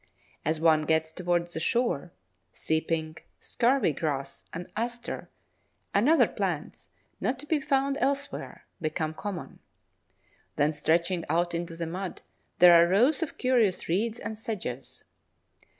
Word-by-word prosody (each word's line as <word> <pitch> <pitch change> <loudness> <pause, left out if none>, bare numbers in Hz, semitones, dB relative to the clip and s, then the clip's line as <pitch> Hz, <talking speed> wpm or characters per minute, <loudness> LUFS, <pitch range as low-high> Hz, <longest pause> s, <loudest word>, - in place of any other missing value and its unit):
As 155 +1 0
one 155 -1 +4
gets 160 0 +1
towards 175 0 -1
the - - -3
shore, 180 - 0 0.4
Sea 160 0 0
pink, 160 -1 -4
Scurvy 250 - +2
grass, 140 -2 -3
an 175 +1 -6
Aster, 240 +2 -4 0.6
and 210 +8 +4
other 325 - +6
plants, - - -4 0.3
not 255 - 0
to 280 - -9
be 300 -1 +1
found 275 0 +1
elsewhere, 280 +2 -2 0.2
become 155 0 -2
common. 195 +1 -6 1.0
Then 150 +2 +2
stretching 170 +4 +1
out 175 +1 +1
into 170 0 -3
the 165 0 -3
mud 180 +3 -5 0.3
there 180 0 +9
are 170 0 +7
rows 245 - +4
of 325 - -3
curious 240 -7 +2
reeds 215 +7 0
and 220 -1 -5
sedges. 210 - -5
175 Hz, 135 wpm, -28 LUFS, 160-240 Hz, 1.0 s, there